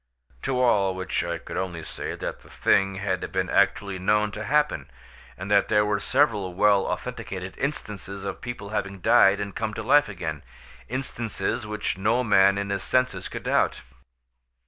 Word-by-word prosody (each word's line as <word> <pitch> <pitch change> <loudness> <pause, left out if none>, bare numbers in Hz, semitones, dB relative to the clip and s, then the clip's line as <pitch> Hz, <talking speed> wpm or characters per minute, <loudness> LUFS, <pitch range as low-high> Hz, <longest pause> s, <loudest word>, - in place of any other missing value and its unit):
To 130 -1 -1
all 100 -7 +3
which 95 -1 -2
I 85 0 -2
could - - -8
only 90 -3 -3
say - - -5
that - - -5
the - - -18
thing 95 0 +2
had 95 -2 -2
been - - -1
actually 100 -1 +2
known 105 +2 +2
to 105 +2 -5
happen, 150 +1 +1 0.5
and 95 +3 -6
that 100 -1 +4
there 105 -1 +3
were 105 -1 0
several 105 -8 +1
well 100 0 +4
authenticated 95 -1 -5
instances 100 -8 -4
of 100 - -5
people 120 -5 -6
having 100 -2 -3
died 95 +3 +5
and 100 -1 -5
come 110 -2 -3
to 110 - -4
life 145 +4 +4
again—instances 95 - -5
which 105 -2 -2
no 115 +5 +2
man 100 -3 +5
in 100 0 -2
his 100 -1 -1
senses 125 -7 0
could - - -6
doubt. - - +1
100 Hz, 170 wpm, -25 LUFS, 95-110 Hz, 0.5 s, died